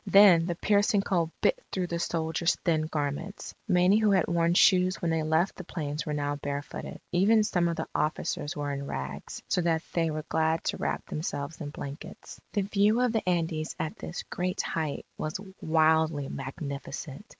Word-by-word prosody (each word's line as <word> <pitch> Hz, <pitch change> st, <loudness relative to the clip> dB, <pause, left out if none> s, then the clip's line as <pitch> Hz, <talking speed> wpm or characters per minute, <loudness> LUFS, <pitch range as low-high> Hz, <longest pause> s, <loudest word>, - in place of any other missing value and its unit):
Then 190 Hz, -4 st, +7 dB
the 175 Hz, -, -1 dB
piercing 205 Hz, +2 st, +3 dB
cold 175 Hz, -4 st, 0 dB
bit -, -, +2 dB
through 185 Hz, -2 st, -1 dB
the 170 Hz, -1 st, -3 dB
soldiers' 165 Hz, 0 st, 0 dB
thin 155 Hz, -3 st, +2 dB
garments. 150 Hz, +6 st, -4 dB
Many 185 Hz, +2 st, +4 dB
who 215 Hz, -1 st, +3 dB
had 190 Hz, -4 st, +4 dB
worn 170 Hz, 0 st, +2 dB
shoes 185 Hz, -1 st, +5 dB
when 170 Hz, -, 0 dB
they 160 Hz, -1 st, +1 dB
left 160 Hz, +4 st, +1 dB
the 185 Hz, -, -6 dB
plains, 155 Hz, -3 st, -4 dB
were 150 Hz, -, -1 dB
now 145 Hz, 0 st, -1 dB
barefooted. 140 Hz, 0 st, -5 dB
Even 205 Hz, +5 st, +4 dB
some 175 Hz, -4 st, +1 dB
of 170 Hz, -, -1 dB
the -, -, -4 dB
officers 150 Hz, -1 st, -1 dB
were 145 Hz, -1 st, -2 dB
in 140 Hz, 0 st, -4 dB
rags, 70 Hz, -, -5 dB
so 180 Hz, -, +1 dB
that 165 Hz, -1 st, +1 dB
they 165 Hz, -1 st, +1 dB
were 155 Hz, 0 st, -4 dB
glad 160 Hz, 0 st, +1 dB
to -, -, -1 dB
wrap -, -, -2 dB
themselves 155 Hz, 0 st, -4 dB
in 145 Hz, -, -4 dB
blankets. 145 Hz, 0 st, -9 dB
The 205 Hz, -, +1 dB
view 205 Hz, +3 st, +3 dB
of 250 Hz, -1 st, +3 dB
the 220 Hz, -5 st, 0 dB
Andes 160 Hz, -3 st, -1 dB
at 155 Hz, -, -3 dB
this 175 Hz, -, -5 dB
great 180 Hz, +1 st, -2 dB
height 155 Hz, -3 st, -3 dB
was 155 Hz, +4 st, -3 dB, 0.2 s
wildly 160 Hz, -2 st, +3 dB
magnificent. 140 Hz, +3 st, -6 dB
165 Hz, 185 wpm, -28 LUFS, 150-185 Hz, 0.2 s, Then